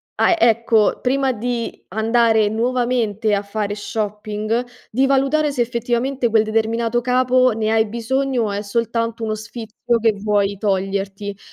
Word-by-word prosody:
ah 350 - +3
ecco, 230 -3 +3
prima 265 +1 +1
di 235 +1 -4
andare 220 +1 +2
nuovamente 230 -2 0
a 200 - -2
fare 205 0 -3
shopping 215 +2 -3 0.2
di 260 +4 +2
valutare 275 +3 +2
se 265 -3 -1
effettivamente 240 +2 -1
quel 220 -1 +4
determinato 225 +2 0
capo 255 +1 +3
ne 220 0 -1
hai 220 0 +3
bisogno 240 +3 -1
o 210 - -2
è 200 +1 -3
soltanto 230 +1 -2
uno 215 -1 -1
sfizio 225 +1 -3
che 225 -1 +3
vuoi 200 -1 0
toglierti. 195 0 -2
225 Hz, 140 wpm, -20 LUFS, 210-245 Hz, 0.2 s, quel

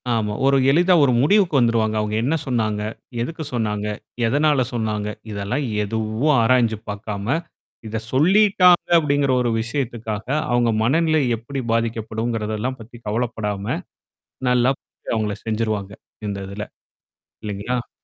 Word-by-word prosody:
ஆமா. 105 -2 -1
ஒரு 135 0 +5
எளிதா 175 +4 +4
ஒரு 130 -3 +4
முடிவுக்கு 185 0 +3
வந்துருவாங்க. 115 -2 +2
அவங்க 105 0 -2
என்ன 150 +6 +1
சொன்னாங்க? 110 -4 0 0.4
எதுக்கு 160 +5 -4
சொன்னாங்க? 105 -3 -1 0.4
எதனால 145 +1 +3
சொன்னாங்க? 105 -2 -1 0.2
இதெல்லாம் 105 +8 -2 0.2
எதுவும் 110 +7 0
ஆராய்ஞ்சு 115 -2 +3
பார்க்காம. 105 +5 -2 0.5
இத 110 +1 -3
சொல்லிட்டாங்க 180 +4 +5
அப்படிங்கிற 145 -3 +2
ஒரு 120 - +1
விஷயத்துக்காக 115 -3 -3 0.3
அவங்க 120 -1 +3
மனநிலை 155 +4 +3 0.2
எப்படி 135 +4 -6
பாதிக்கப்படும்ங்கிறதெல்லாம் 115 +1 -2
பத்தி 120 +2 -12
கவலப்படாம. 110 -2 -2 0.7
நல்லா 125 +1 +4
ப - - -73 0.4
அவங்கள 105 -2 -1
செஞ்சுருவாங்க. 110 -3 -2 0.3
இந்த 100 -1 -3
இதுல. 100 +1 -5 0.8
இல்லைங்களா? 105 +4 -3
115 Hz, 115 wpm, -22 LUFS, 105-135 Hz, 0.8 s, ஒரு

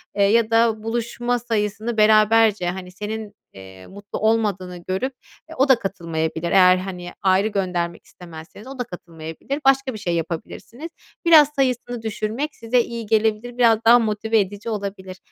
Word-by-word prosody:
eee, 200 - +2
ya 220 +2 +3
da 225 -1 +2
buluşma 240 +2 -2
sayısını 225 0 -2
beraberce, 215 -2 +4
hani, 180 0 -7
senin, 210 +2 -6 0.2
eee, 95 -1 -13
mutlu 200 +1 -8
olmadığını 205 -5 0
görüp 190 +9 -3 0.4
e, - - -9
o 270 0 +2
da 260 -3 +5
katılmayabilir. 165 -3 -3
Eğer, 185 -1 +6
hani, 180 -1 -6
ayrı 195 +1 +3
göndermek 180 -4 -3
istemezseniz 170 +5 -13
o 270 0 -10
da - - 0
katılmayabilir. 170 - -7
Başka 270 -1 +3
bir 215 - -7
şey 175 -4 -2
yapabilirsiniz. 200 - -6 0.4
Biraz 310 -4 +7
sayısını 245 -3 -1
düşürmek 220 +6 -4
size 230 +2 0
iyi 235 -1 -6
gelebilir. 220 +3 0
Biraz 230 -3 +4
daha 235 +2 +7
motive 220 0 0
edici 205 +3 -3
olabilir. 195 -3 -5
215 Hz, 155 wpm, -21 LUFS, 185-235 Hz, 0.4 s, Biraz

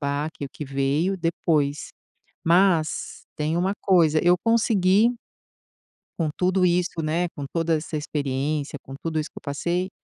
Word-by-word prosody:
baque 145 +1 -3
o - - -16
que 150 - -7
veio, 140 +7 0
depois. 160 -4 0 0.6
Mas 170 -2 +2
tem 155 +2 -1
uma 190 +3 +1
coisa, 165 -5 +4
eu 175 +1 +5
consegui 215 0 +3 1.1
com 160 -2 +1
tudo 185 0 +2
isso, 175 -1 +1
né. 170 +3 0
Com 145 -3 -7
toda 165 +3 0
essa 155 +1 -6
experiência, 145 0 -2
com 135 - -10
tudo 160 -1 -2
isso 150 - -3
que - - -23
eu - - -7
passei, 170 +6 -2
165 Hz, 150 wpm, -24 LUFS, 150-180 Hz, 1.1 s, eu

